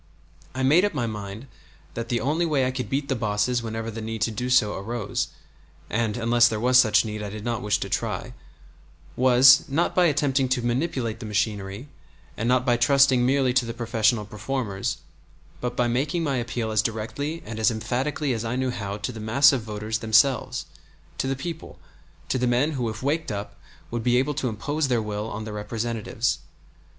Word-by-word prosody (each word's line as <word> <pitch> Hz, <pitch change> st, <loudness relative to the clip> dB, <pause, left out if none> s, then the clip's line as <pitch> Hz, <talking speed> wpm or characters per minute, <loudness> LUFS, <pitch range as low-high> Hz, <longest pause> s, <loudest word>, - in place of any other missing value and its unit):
I 130 Hz, -, -1 dB
made 155 Hz, +8 st, +5 dB
up 205 Hz, -5 st, 0 dB
my 125 Hz, -4 st, 0 dB
mind 105 Hz, +1 st, -6 dB, 0.5 s
that 115 Hz, 0 st, -5 dB
the 120 Hz, -, +1 dB
only 150 Hz, +8 st, +1 dB
way 150 Hz, -6 st, +1 dB
I 130 Hz, -, 0 dB
could 130 Hz, -1 st, -4 dB
beat 140 Hz, +1 st, -1 dB
the 135 Hz, -, 0 dB
bosses 110 Hz, +2 st, 0 dB
whenever 115 Hz, 0 st, -4 dB
the 110 Hz, +1 st, -6 dB
need 110 Hz, 0 st, -5 dB
to 115 Hz, -, 0 dB
do 125 Hz, +4 st, -3 dB
so 110 Hz, -5 st, +4 dB
arose 105 Hz, +1 st, -3 dB, 0.6 s
(and 110 Hz, -1 st, 0 dB
unless 120 Hz, +1 st, +4 dB
there 110 Hz, -2 st, -2 dB
was 125 Hz, +2 st, +5 dB
such 110 Hz, -2 st, +4 dB
need 105 Hz, -1 st, -4 dB
I 105 Hz, -, -4 dB
did 105 Hz, +2 st, -8 dB
not 120 Hz, 0 st, -1 dB
wish 105 Hz, -1 st, +1 dB
to -, -, -2 dB
try) -, -, -3 dB, 0.8 s
was, 130 Hz, +1 st, +7 dB
not 150 Hz, +5 st, 0 dB
by 180 Hz, -, +4 dB
attempting 135 Hz, -3 st, +1 dB
to 125 Hz, -2 st, 0 dB
manipulate 120 Hz, -3 st, -1 dB
the 115 Hz, -, -6 dB
machinery, 105 Hz, +2 st, -2 dB, 0.5 s
and 115 Hz, +2 st, -1 dB
not 125 Hz, 0 st, +3 dB
by 120 Hz, -2 st, +3 dB
trusting 130 Hz, 0 st, +4 dB
merely 130 Hz, 0 st, +2 dB
to 130 Hz, 0 st, +3 dB
the 115 Hz, 0 st, -5 dB
professional 115 Hz, -2 st, +1 dB
reformers, 105 Hz, -1 st, -3 dB, 0.6 s
but 125 Hz, 0 st, -3 dB
by 125 Hz, -1 st, +2 dB
making 145 Hz, +8 st, 0 dB
my 140 Hz, -4 st, 0 dB
appeal 120 Hz, -2 st, -2 dB
as 110 Hz, -2 st, +3 dB
directly 135 Hz, +9 st, -4 dB
and 110 Hz, 0 st, -6 dB
as 110 Hz, -, +4 dB
emphatically 130 Hz, +5 st, -1 dB
as 115 Hz, -1 st, -3 dB
I 115 Hz, +2 st, -2 dB
knew 130 Hz, 0 st, 0 dB
how 100 Hz, -3 st, -4 dB
to 105 Hz, +4 st, -4 dB
the 115 Hz, -, -9 dB
mass 140 Hz, +7 st, +5 dB
of 130 Hz, -, 0 dB
voters 110 Hz, +1 st, -4 dB
themselves, 115 Hz, +3 st, +2 dB, 0.5 s
to -, -, 0 dB
the 135 Hz, -, 0 dB
people, 160 Hz, +4 st, -7 dB, 0.5 s
to 130 Hz, -, 0 dB
the 125 Hz, -, +1 dB
men 125 Hz, +6 st, +2 dB
who 125 Hz, -6 st, -2 dB
if 110 Hz, +3 st, -7 dB
waked 155 Hz, 0 st, -1 dB
up 100 Hz, 0 st, -5 dB, 0.4 s
would 120 Hz, 0 st, -2 dB
be 125 Hz, +1 st, +3 dB
able 135 Hz, +4 st, +1 dB
to 135 Hz, -3 st, -1 dB
impose 145 Hz, +8 st, -2 dB
their 125 Hz, -3 st, +1 dB
will 105 Hz, 0 st, -3 dB
on 110 Hz, -, -5 dB
their 110 Hz, -1 st, -6 dB
representatives. 110 Hz, +1 st, -2 dB
120 Hz, 200 wpm, -25 LUFS, 110-130 Hz, 0.8 s, was